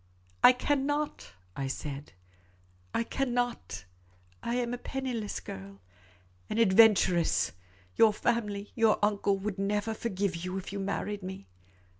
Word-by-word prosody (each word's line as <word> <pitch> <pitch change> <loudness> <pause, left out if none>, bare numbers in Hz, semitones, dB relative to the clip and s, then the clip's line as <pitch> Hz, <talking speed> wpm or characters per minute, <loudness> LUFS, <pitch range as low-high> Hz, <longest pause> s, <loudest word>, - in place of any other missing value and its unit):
" 90 0 -33
I - - +11
cannot," 290 - -1 0.2
I 135 - -2
said. 140 +1 -5 0.4
" 90 0 -33
I - - +2
cannot 245 - -2 0.3
— 90 0 -32
I - - +1
am 245 -1 -1
a 245 - -4
penniless 250 -6 -3
girl 100 +1 -9 0.4
— 90 0 -33
an - - -2
adventuress. 190 - +5 0.5
Your 225 -1 +7
family, 210 -2 -1
your 225 -2 +4
uncle, 200 -1 +1
would 195 0 -4
never 205 +2 0
forgive 200 -5 -2
you 185 +2 -4
if 195 +1 -6
you 200 - -3
married 200 +1 -2
me. 185 - -7
200 Hz, 145 wpm, -30 LUFS, 140-230 Hz, 0.5 s, I